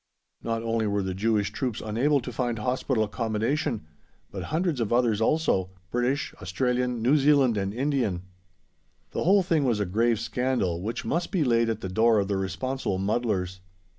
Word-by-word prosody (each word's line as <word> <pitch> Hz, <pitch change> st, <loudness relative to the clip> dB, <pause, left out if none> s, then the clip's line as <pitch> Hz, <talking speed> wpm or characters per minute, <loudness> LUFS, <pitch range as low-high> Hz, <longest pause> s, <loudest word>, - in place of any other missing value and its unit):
Not 115 Hz, 0 st, -2 dB
only 115 Hz, -1 st, 0 dB
were 100 Hz, -1 st, 0 dB
the 95 Hz, 0 st, -2 dB
Jewish 105 Hz, +1 st, +1 dB
troops 125 Hz, -6 st, -3 dB
unable 130 Hz, +7 st, +1 dB
to 125 Hz, -, -6 dB
find 120 Hz, -1 st, -1 dB
hospital 125 Hz, +1 st, 0 dB
accommodation, 115 Hz, -, -1 dB, 0.5 s
but -, -, -5 dB
hundreds 160 Hz, -2 st, -1 dB
of 110 Hz, -, -1 dB
others 120 Hz, -3 st, +2 dB
also 110 Hz, -, +2 dB, 0.2 s
British, 125 Hz, +4 st, 0 dB
Australian, 125 Hz, +5 st, -1 dB
New 135 Hz, +6 st, +4 dB
Zealand, 140 Hz, -4 st, +4 dB
and 100 Hz, -1 st, -1 dB
Indian. 120 Hz, -7 st, -1 dB, 0.9 s
The -, -, -2 dB
whole 195 Hz, +2 st, +5 dB
thing 165 Hz, -4 st, +1 dB
was 120 Hz, -5 st, +1 dB
a 105 Hz, -, +1 dB
grave 115 Hz, +4 st, +1 dB
scandal, 115 Hz, -7 st, -1 dB
which 110 Hz, +4 st, -4 dB
must 170 Hz, +9 st, -1 dB
be 180 Hz, -5 st, +2 dB
laid 115 Hz, -3 st, +2 dB
at 110 Hz, -1 st, -2 dB
the -, -, -3 dB
door 110 Hz, +4 st, +3 dB
of 100 Hz, -1 st, 0 dB
the 100 Hz, -, +1 dB
responsible 100 Hz, +2 st, -2 dB
muddlers. 95 Hz, -3 st, -1 dB
115 Hz, 170 wpm, -26 LUFS, 105-130 Hz, 0.9 s, whole